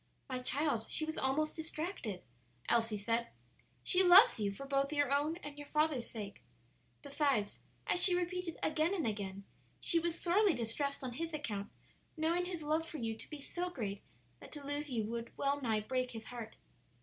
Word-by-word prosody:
"My 255 -2 -3
child, 250 -2 0
she 310 - +1
was 315 0 -3
almost 290 +4 0
distracted," 315 - -4 0.4
Elsie 225 -2 +2
said. 230 +3 0 0.6
"She 365 - +5
loves 360 - +8
you 205 -2 +1
for 275 +8 -7
both 275 +1 +1
your 290 -3 +1
own 300 +4 +1
and 290 0 -7
your 290 - -8
father's 300 -5 +1
sake. 205 -3 -7 0.6
Besides, 280 -7 0 0.3
as 355 - +3
she 360 -2 +6
repeated 360 -1 -2
again 315 +4 +2
and 335 - -1
again, 200 -3 -3 0.4
she 335 - +3
was 340 0 -2
sorely 380 +1 +4
distressed 270 +5 -2
on 250 -2 -3
his 325 +4 -3
account, 210 -9 -3 0.5
knowing 335 +3 +1
his 350 -3 -4
love 310 +2 +1
for 325 -1 -7
you 225 -3 -2
to - - -11
be 300 - -6
so 355 +5 -3
great 205 - -4 0.4
that - - -12
to 290 -2 -8
lose 290 +1 -3
you 235 -4 0
would 235 +1 -5
well 280 +1 +1
nigh 220 -4 +1
break 255 +3 -1
his 225 -1 -7
heart." 230 -2 -7
285 Hz, 185 wpm, -35 LUFS, 230-320 Hz, 0.6 s, loves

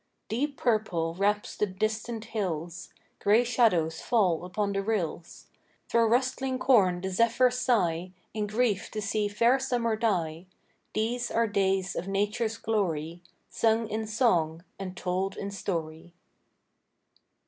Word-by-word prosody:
Deep 280 +5 -1
purple 195 -8 0
wraps 205 +3 0
the 210 - 0
distant 215 +3 -3
hills, 175 -5 -3 0.3
Gray 215 +4 +4
shadows 180 -10 +2
fall 185 -9 +2
upon 200 +2 -1
the 195 - 0
rills;— 190 -6 -3 0.4
Thro' 230 -1 +4
rustling 255 +2 +1
corn 190 -10 +3
the 190 +1 -3
zephyrs 240 +5 +3
sigh, 185 -9 +1 0.2
In 210 -1 -2
grief 215 -1 0
to 215 - -5
see 210 0 0
fair 235 +6 +3
summer 240 -4 0
die. 180 -6 -1 0.5
These 240 +3 -1
are 230 0 +2
days 195 -2 0
of 180 - -3
Nature's 205 +3 -1
glory, 175 -7 -2 0.3
Sung 225 0 +2
in 220 +1 -3
song, 175 -8 +1 0.2
and 185 -2 -6
told 185 +2 -2
in 200 0 -4
story. 170 -3 -4
210 Hz, 130 wpm, -28 LUFS, 180-230 Hz, 0.5 s, Gray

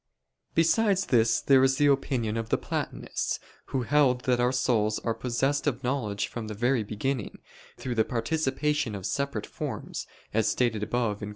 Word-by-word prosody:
Besides 195 +4 +3
this, 115 -2 +3
there 135 -1 +5
is 135 0 +4
the 145 - +3
opinion 130 -5 +1
of 115 -1 -3
the - - +2
Platonists, - - -3 0.3
who 130 -2 -1
held 130 -1 +3
that 125 -1 +1
our 125 +1 +3
souls 115 -4 +1
are 115 - -1
possessed 135 +5 -1
of 130 -2 -1
knowledge 110 -6 -1
from 115 -2 -6
the 105 - -5
very 120 +3 +2
beginning, 110 +2 -3 0.4
through 125 - -3
the 110 -2 +3
participation 140 0 -1
of 95 -2 -6
separate 140 -1 -2
forms, - - -5 0.3
as 110 0 +2
stated 115 -4 +1
above 110 -1 -1
(Q. 105 - -5
125 Hz, 170 wpm, -28 LUFS, 110-140 Hz, 0.4 s, there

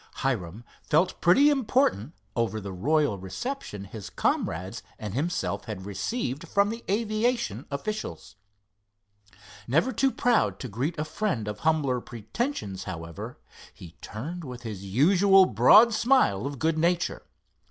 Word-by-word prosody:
Hiram 110 -5 -2 0.2
felt 160 +5 +1
pretty 275 +13 +6
important 240 - +1 0.2
over 115 -2 0
the 100 -2 -7
royal 145 - +1
reception 105 - -5
his 100 0 -8
comrades 95 +7 -1 0.2
and 105 -3 -6
himself 160 +8 -2
had 105 -5 -6
received 135 - -3
from 200 +4 +2
the 230 +1 -7
aviation 230 +3 0
officials. 210 - -5 1.3
Never 165 - +2
too 270 +3 +2
proud 245 -3 +1
to 130 - -4
greet 130 - -3
a 150 - -2
friend 155 - -2
of 105 0 -4
humbler 145 -6 +1
pretensions, 110 - -4
however, 85 -2 -7 0.4
he 85 - -11
turned 165 +11 -6
with 125 -4 -8
his 105 -4 -6
usual 185 - +5
broad 185 - +6
smile 220 - +3
of 140 0 -6
good 160 +3 0
nature. 170 +2 +1
145 Hz, 130 wpm, -27 LUFS, -, 1.3 s, pretty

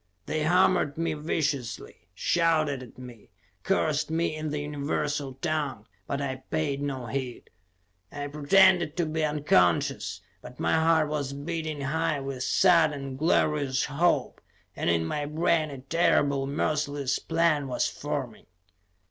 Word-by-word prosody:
They 155 - -2
hammered 175 -1 +2
me 165 -1 -1
viciously, 140 - -3
shouted 155 - +1
at 125 - -13
me, 125 -4 -12 0.3
cursed 155 -6 0
me 160 0 0
in 155 0 -4
the 150 - -3
universal 145 -1 -2
tongue, 145 -7 -2 0.2
but 140 - -2
I 135 -2 -3
paid 145 -3 -1
no 135 -3 -3
heed. 125 +1 -5 0.6
I 145 0 -5
pretended 160 +3 +4
to 175 - +1
be 155 0 -2
unconscious, 145 - +1 0.2
but - - -12
my 85 - +1
heart 160 -1 +3
was 145 -2 -3
beating 155 0 -4
high 155 +2 0
with 135 -2 -5
sudden, 150 -4 +3
glorious 145 -2 +1
hope, 165 +5 0 0.3
and - - -1
in 85 -1 +2
my 145 - -2
brain 155 0 +1
a 140 - -7
terrible, 140 -2 +2
merciless 145 -1 -1
plan 165 -4 +1
was 125 - 0
forming. 135 -6 -5
145 Hz, 135 wpm, -27 LUFS, 135-160 Hz, 0.6 s, pretended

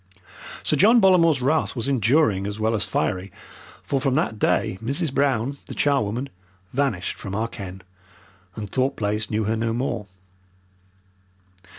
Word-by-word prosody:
Sir - - +2
John 225 +5 +6
Bollamore's 165 - +4
wrath 155 +3 +1
was 120 0 -2
enduring 120 -5 +2
as 105 +1 -5
well 110 +1 +1
as 105 -2 0
fiery, 95 0 -2 0.5
for 135 -2 -1
from 135 -1 +1
that 135 -8 0
day 95 - +1
Mrs. 140 +4 -1
Brown, 140 -1 0
the - - -7
charwoman, 135 -2 0 0.4
vanished 125 -10 -1
from 95 0 -5
our 110 +2 0
ken, 95 -5 -9 0.7
and 105 -2 -5
Thorpe 130 +6 0
Place 105 0 -1
knew 110 0 0
her 110 +2 0
no 115 0 -1
more. 120 -4 -2
115 Hz, 150 wpm, -23 LUFS, 105-140 Hz, 0.7 s, John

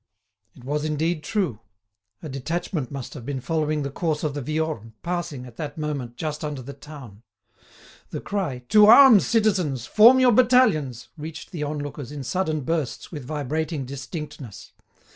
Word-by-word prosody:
It 125 - -15
was 145 +3 -2
indeed 155 +1 -1
true. 195 - -1 0.6
A - - -5
detachment 145 - -3
must 135 -3 -7
have 135 - -9
been 135 +2 -3
following 155 +1 -1
the 140 - -4
course 155 0 -2
of 150 -2 -1
the 145 - -4
Viorne, 155 -6 -3
passing, 170 -7 -3
at 120 -2 -13
that 150 -1 -5
moment, 145 -6 -4
just 155 -1 -4
under 145 -4 -4
the 140 +3 -8
town. 135 -7 -12 0.9
The - - -5
cry, 170 -12 -3
"To 210 0 +7
arms, 235 -2 +8
citizens! 190 - +1
Form 235 +5 +7
your 255 -1 +6
battalions!" 210 - +3
reached 160 +1 -8
the 165 - -5
on 150 +1 -2
lookers 145 -2 -6
in 145 -2 -6
sudden 155 +1 -1
bursts 155 -1 -3
with 145 -6 -7
vibrating 150 +1 -3
distinctness. 140 - -8
150 Hz, 160 wpm, -24 LUFS, 135-170 Hz, 0.9 s, arms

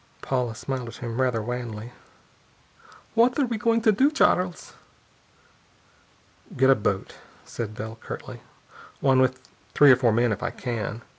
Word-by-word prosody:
Paula 125 -4 -1
smiled 130 0 -4
at 115 - -9
him, 120 0 -4
rather 125 -4 0
wanly. 120 -1 -5 1.2
"What 235 +2 +3
are 285 - +3
you 235 -2 -3
going 230 0 +2
to 220 - +5
do, 260 +8 +3
Charles?" 180 - +1 1.8
"Get 130 +1 +5
a - - +6
boat," 100 -3 -2 0.3
said 110 -2 -6
Bell 110 +1 -7
curtly. - - -8 0.6
"One 135 -1 +3
with 130 0 0 0.3
three 145 -2 +8
or - - +8
four 125 -2 +2
men, 120 +1 +2
if 105 - -3
I - - -1
can. 115 -2 -5
125 Hz, 150 wpm, -25 LUFS, 115-145 Hz, 1.8 s, three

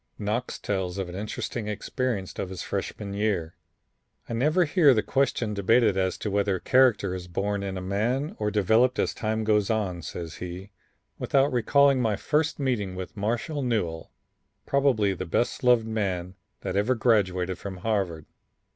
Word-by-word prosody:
Knox 110 +4 -2
tells 95 -2 -2
of 95 -2 -3
an 90 - -8
interesting 105 +2 -4
experience 105 -1 -3
of 95 - -3
his 95 -2 -6
Freshman 100 -1 -4
year. 100 -6 -1 0.7
"I - - -5
never 155 +10 +3
hear 145 -4 +5
the 110 - +1
question 130 -5 0
debated 105 +1 +3
as 95 -1 0
to 105 - -4
whether 100 -1 +1
character 120 -7 +3
is 90 -1 -6
born 100 +3 -2
in 95 -1 -4
a 95 - -5
man 120 - -1
or 105 -1 0
developed 110 +5 +3
as - - 0
time 110 0 -2
goes 105 -2 +2
on," 100 -6 -1
says 85 +1 -7
he, 90 +3 -7 0.5
"without 135 -1 +2
recalling 135 +3 +4
my 110 -3 +1
first 155 +9 0
meeting 115 -9 -1
with 95 +2 -7
Marshall 115 +9 -2
Newell, 95 -11 -2 0.5
probably 130 -8 +2
the 95 0 -5
best 120 +10 -1
loved 125 -2 +5
man 95 -5 -2 0.3
that - - -3
ever 105 +6 +2
graduated 95 -6 +1
from 95 -2 -6
Harvard. 90 -6 -1
105 Hz, 165 wpm, -26 LUFS, 95-120 Hz, 0.7 s, hear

